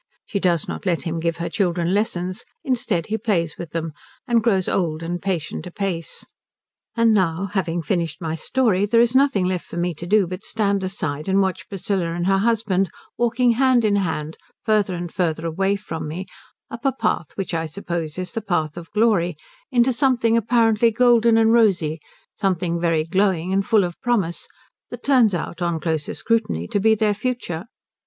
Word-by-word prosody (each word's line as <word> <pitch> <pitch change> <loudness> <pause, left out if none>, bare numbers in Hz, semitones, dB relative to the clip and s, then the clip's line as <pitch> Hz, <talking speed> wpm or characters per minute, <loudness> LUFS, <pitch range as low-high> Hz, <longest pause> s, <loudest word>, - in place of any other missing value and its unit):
She 200 - -2
does 175 -4 +1
not 200 - -5
let 170 -2 +1
him 165 0 -3
give 165 0 -1
her 170 0 -3
children 175 -4 0
lessons; 185 -1 -1 0.2
instead 235 - 0
he 220 +1 -2
plays 175 -8 0
with 170 - -6
them, 165 0 -4 0.3
and 235 -2 +3
grows 195 -5 +1
old 165 -3 -1
and 175 +1 -3
patient 185 -2 -3
apace. 180 -3 -4 0.7
And 230 -1 +4
now 185 -1 0
having 175 -4 -1
finished 165 0 -1
my 160 -3 -3
story, 205 - +1
there 230 +2 +3
is 235 0 +4
nothing 260 -8 +3
left 180 -1 -1
for - - -8
me 175 0 0
to 170 +3 -8
do 205 +1 +4
but 185 +3 -7
stand 200 -3 0
aside 155 -6 -3
and 190 +1 +3
watch 190 0 -1
Priscilla 190 -4 -2
and 175 0 -2
her 195 +1 +3
husband 205 -4 +1 0.3
walking 240 +1 +2
hand 250 -1 +3
in 205 -1 +3
hand 160 -4 -2 0.3
farther 210 -4 +2
and 175 -1 -6
farther 165 -3 -1
away 195 +5 0
from 165 -6 -6
me 175 +5 -5 0.5
up 230 +2 -7
a 270 - +3
path 170 - -2
which 195 -3 -4
I 165 -1 -1
suppose 170 -2 -4
is 185 0 -4
the 225 - -3
path 170 -6 -1
of 170 -1 -8
glory, 210 -6 +2 0.3
into 250 0 +3
something 240 -3 +2
apparently 230 0 +3
golden 235 0 +4
and 225 0 +4
rosy, 175 -9 +2 0.3
something 175 -3 -1
very 165 -2 +2
glowing 185 0 +1
and 195 +1 +2
full 210 0 +3
of 175 -1 -5
promise, 200 -9 0 0.4
that - - -8
turns 245 -8 +4
out 170 +1 -5
on 170 -2 0
closer 160 -2 -2
scrutiny 220 - 0
to - - +1
be 220 +2 +4
their 215 -1 +2
future. 210 -7 -3
190 Hz, 185 wpm, -22 LUFS, 170-225 Hz, 0.7 s, And